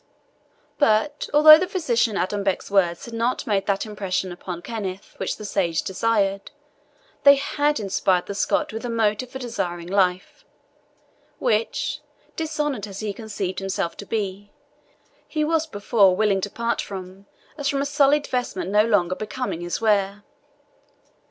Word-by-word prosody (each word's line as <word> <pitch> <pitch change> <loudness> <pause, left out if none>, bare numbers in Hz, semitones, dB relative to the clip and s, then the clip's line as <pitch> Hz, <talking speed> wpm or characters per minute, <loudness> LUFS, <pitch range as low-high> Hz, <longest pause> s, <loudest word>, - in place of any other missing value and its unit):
But 285 +3 +2
although 310 +1 +9
the 365 - -1
physician 240 - 0
Adonbec's 195 +1 -1
words 175 -4 +2
had 235 - -10
not 230 +2 -1
made 200 -3 0
that 200 +1 0
impression 195 -3 -3
upon 175 0 -7
Kenneth 200 -3 -6
which - - -3
the 210 - -8
sage 175 -5 0
desired, 200 -1 0 0.7
they 280 0 +8
had 290 +1 0
inspired 190 -3 +1
the - - -5
Scot 200 - 0
with 225 - -5
a 245 - -3
motive 225 +1 0
for 265 - -7
desiring 180 -9 -4
life, 185 - 0 0.9
which, 220 +1 0 0.4
dishonoured 295 -8 -2
as 200 0 -8
he 210 -2 -3
conceived 200 -4 -4
himself 195 -3 -2
to 205 - -9
be, 205 -2 -3 0.8
he 305 -1 -1
was 320 +1 +1
before 205 -6 +3
willing 200 -1 +2
to 205 - -3
part 235 +2 -1
from 190 0 -9 0.3
as 285 -2 -2
from 275 0 0
a - - -3
sullied 290 0 +3
vestment 245 -7 -3
no 210 +1 +5
longer 190 -6 +2
becoming 215 -2 -4
his 175 -1 -3
wear. 205 -2 +1
210 Hz, 150 wpm, -23 LUFS, 195-245 Hz, 0.9 s, although